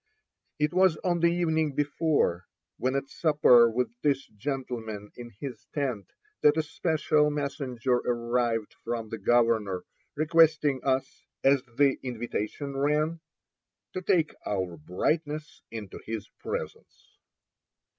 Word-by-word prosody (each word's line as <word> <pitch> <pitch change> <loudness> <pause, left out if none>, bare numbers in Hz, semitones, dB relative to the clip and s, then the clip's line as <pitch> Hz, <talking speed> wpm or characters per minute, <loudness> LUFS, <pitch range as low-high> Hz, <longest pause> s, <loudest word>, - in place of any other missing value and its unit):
It 150 +2 +1
was 185 -3 +4
on 175 -2 +1
the 170 - +4
evening 160 -4 +1
before, 145 - +1 0.3
when 130 +1 0
at 140 0 -1
supper 140 -7 +5
with 115 0 -1
this 140 -2 +1
gentleman 110 -3 -5
in 120 -1 -9
his 125 -5 -7
tent, 130 -9 -2 0.3
that 150 +1 +5
a 160 - +2
special 155 -1 +1
messenger 135 -4 -1
arrived 120 -2 -1
from 115 -2 -3
the 110 - -5
governor, 110 -4 +2 0.3
requesting 155 -3 +3
us, 130 -1 -1 0.2
as 135 0 +5 0.2
the 140 -2 +4
invitation 120 +2 -4
ran, 150 +4 +1 0.7
"to 185 - -3
take 170 -3 +2
our 95 -4 -2
brightness 150 - -2
into 110 -4 -7
his 110 -1 -5
presence." - - -7
135 Hz, 120 wpm, -28 LUFS, 115-150 Hz, 0.7 s, supper